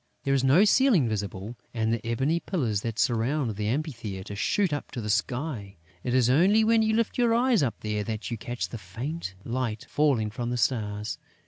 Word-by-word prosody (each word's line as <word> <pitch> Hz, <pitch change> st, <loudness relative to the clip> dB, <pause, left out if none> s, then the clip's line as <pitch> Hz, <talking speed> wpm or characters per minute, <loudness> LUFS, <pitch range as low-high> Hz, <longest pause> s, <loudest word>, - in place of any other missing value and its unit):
There 135 Hz, -, +1 dB
is 135 Hz, -2 st, +2 dB
no 145 Hz, +10 st, +6 dB
ceiling 215 Hz, -, +4 dB
visible; 105 Hz, +1 st, -4 dB, 0.2 s
and 110 Hz, 0 st, +1 dB
the 115 Hz, -1 st, -2 dB
ebony 135 Hz, +8 st, 0 dB
pillars 120 Hz, -, -1 dB
that 115 Hz, -1 st, -4 dB
surround 120 Hz, +1 st, +1 dB
the 105 Hz, 0 st, -2 dB
amphitheatre 110 Hz, -, -3 dB
shoot 180 Hz, -, +1 dB
up 145 Hz, -, -4 dB
to -, -, -4 dB
the 105 Hz, -2 st, -2 dB
sky. 120 Hz, -, -2 dB, 0.3 s
It 125 Hz, -, 0 dB
is 125 Hz, -2 st, +4 dB
only 185 Hz, -, +5 dB
when 225 Hz, 0 st, +4 dB
you 220 Hz, 0 st, +2 dB
lift 230 Hz, +2 st, 0 dB
your 235 Hz, -2 st, +4 dB
eyes 240 Hz, -4 st, +3 dB
up 120 Hz, -7 st, 0 dB
there 105 Hz, -1 st, -2 dB
that 110 Hz, +1 st, -4 dB
you -, -, -1 dB
catch 120 Hz, +2 st, -4 dB
the 115 Hz, -, -6 dB
faint 115 Hz, -, -5 dB
light 115 Hz, -2 st, -3 dB
falling 130 Hz, -8 st, +1 dB
from 120 Hz, +1 st, -3 dB
the 125 Hz, -, -1 dB
stars. 105 Hz, -3 st, -1 dB
120 Hz, 200 wpm, -27 LUFS, 110-155 Hz, 0.3 s, no